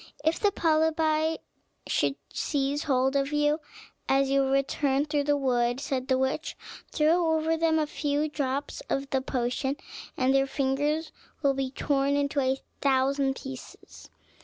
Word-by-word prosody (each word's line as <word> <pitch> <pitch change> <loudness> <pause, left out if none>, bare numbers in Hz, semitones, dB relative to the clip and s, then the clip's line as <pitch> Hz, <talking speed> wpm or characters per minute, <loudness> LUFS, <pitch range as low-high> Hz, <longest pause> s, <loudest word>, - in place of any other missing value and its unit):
"If 320 +1 +2
the 410 - +3
polypi 315 -2 +1 0.5
should - - +1 0.2
seize 285 0 -1
hold 265 -1 +2
of 275 +1 +1
you 295 +1 +2 0.5
as 270 0 +3
you 275 0 +4
return 275 +1 +1
through 295 -1 0
the 290 0 +2
wood," 245 -2 +1
said 270 -2 -3
the 260 - +2
witch, 265 +4 -2 0.3
"throw 320 +1 +3
over 320 +1 +1
them 325 0 +2
a 310 - +2
few 295 0 -1
drops 285 -1 -3
of 275 0 -2
the 265 - +1
potion, 260 +2 -1 0.4
and 260 +1 +2
their 270 0 +3
fingers 290 +4 0 0.3
will 280 -1 +4
be 270 -1 -2
torn 275 +1 0
into 285 0 0
a 265 0 +1 0.2
thousand 270 0 +2
pieces." 265 -2 -10
280 Hz, 150 wpm, -27 LUFS, 270-305 Hz, 0.5 s, you